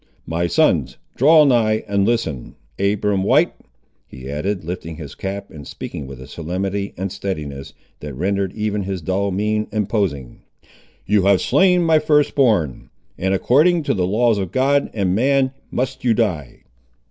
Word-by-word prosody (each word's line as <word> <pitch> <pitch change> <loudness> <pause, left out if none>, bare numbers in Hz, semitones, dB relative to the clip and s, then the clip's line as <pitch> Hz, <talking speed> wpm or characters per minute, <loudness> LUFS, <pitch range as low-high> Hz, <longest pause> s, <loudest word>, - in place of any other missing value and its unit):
My 85 +2 -1
sons, - - +1 0.2
draw 155 +4 +6
nigh 110 -5 +2
and 100 0 +1
listen. 115 - -2 0.2
Abiram 100 0 +1
White," - - +3 0.5
he 65 +1 -11
added, 90 +6 -2
lifting 85 -1 -6
his 75 -3 -9
cap, 100 +1 -6
and 75 -3 -10
speaking 70 - -7
with 65 -1 -10
a 65 - -9
solemnity 95 +6 -4
and 95 +1 -3
steadiness, 75 -9 -5 0.2
that 75 -2 -7
rendered 95 +4 -1
even 105 -1 -2
his 95 -3 -4
dull 95 +4 0
mien 105 +3 -1
imposing, 100 - -2 0.6
"you 100 -1 +2
have 100 -1 +4
slain 180 -2 +3
my 160 -2 +4
first 150 -1 +2
born, 105 - +1 0.3
and 95 +1 0
according 155 - +3
to - - 0
the 90 -2 0
laws 110 +2 +2
of 95 -3 -4
God 140 +4 +2
and 95 -4 0
man 130 +4 +2 0.2
must 130 +2 -3
you 120 -3 +3
die!" 85 - -2
100 Hz, 160 wpm, -20 LUFS, 90-115 Hz, 0.6 s, draw